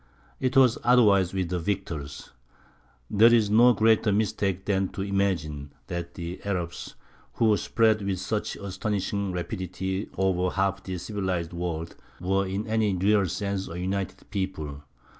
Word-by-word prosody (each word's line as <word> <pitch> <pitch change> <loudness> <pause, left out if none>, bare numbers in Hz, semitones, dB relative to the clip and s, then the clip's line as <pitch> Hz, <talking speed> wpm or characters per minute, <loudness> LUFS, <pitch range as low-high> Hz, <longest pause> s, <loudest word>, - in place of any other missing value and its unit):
It 130 +1 0
was 130 -3 +5
otherwise 105 -7 +5
with 95 -3 -2
the 90 0 -1
victors. 80 -6 -4 0.8
There 110 - +6
is 110 -3 +4
no 120 +3 +7
greater 110 -1 +3
mistake 100 -2 0
than 95 -1 +1
to 95 - -3
imagine 85 -8 -1
that 85 -1 -5
the 85 +1 -6
Arabs, 90 -4 -4 0.4
who 110 -2 +3
spread 110 0 +2
with 100 -1 -1
such 105 +3 -2
astonishing 100 0 -2
rapidity 95 +2 -4
over 90 -1 +1
half 95 0 0
the 95 -1 -5
civilized 90 -3 -3
world, 85 -1 -4 0.2
were 95 +2 0
in 95 +3 -3
any 110 -3 +1
real 100 +1 +3
sense 100 +2 -3
a 85 +1 -6
united 95 0 -3
people. 85 -8 -4
95 Hz, 140 wpm, -26 LUFS, 90-105 Hz, 0.8 s, no